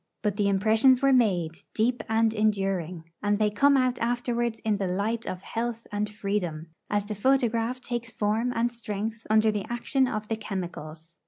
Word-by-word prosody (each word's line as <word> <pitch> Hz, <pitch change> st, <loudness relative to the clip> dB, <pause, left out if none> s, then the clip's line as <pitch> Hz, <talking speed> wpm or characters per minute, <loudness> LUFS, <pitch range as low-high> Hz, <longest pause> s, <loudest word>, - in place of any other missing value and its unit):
But 210 Hz, -2 st, 0 dB
the 205 Hz, -1 st, +1 dB
impressions 220 Hz, +6 st, +4 dB
were 275 Hz, 0 st, +5 dB
made, 190 Hz, -10 st, +2 dB, 0.2 s
deep 235 Hz, +2 st, +1 dB
and 225 Hz, 0 st, +3 dB
enduring; 195 Hz, -6 st, 0 dB, 0.2 s
and 205 Hz, 0 st, +1 dB
they 210 Hz, 0 st, +2 dB
come 280 Hz, +7 st, +4 dB
out 255 Hz, -1 st, +1 dB
afterwards 240 Hz, -1 st, -1 dB
in 215 Hz, -2 st, 0 dB
the 195 Hz, -2 st, -1 dB
light 210 Hz, +5 st, -1 dB
of 185 Hz, +1 st, -5 dB
health 230 Hz, 0 st, -3 dB
and 210 Hz, 0 st, -1 dB
freedom, 185 Hz, -6 st, -3 dB, 0.2 s
as 205 Hz, -1 st, 0 dB
the 210 Hz, -, -4 dB
photograph 240 Hz, +1 st, +1 dB
takes 240 Hz, -2 st, -4 dB
form 220 Hz, +3 st, 0 dB
and 240 Hz, 0 st, 0 dB
strength 220 Hz, 0 st, -5 dB
under 215 Hz, 0 st, +4 dB
the 205 Hz, -2 st, -3 dB
action 260 Hz, +2 st, +1 dB
of 215 Hz, -3 st, -3 dB
the 225 Hz, -, -2 dB
chemicals. 170 Hz, -5 st, -7 dB
215 Hz, 175 wpm, -27 LUFS, 200-235 Hz, 0.2 s, were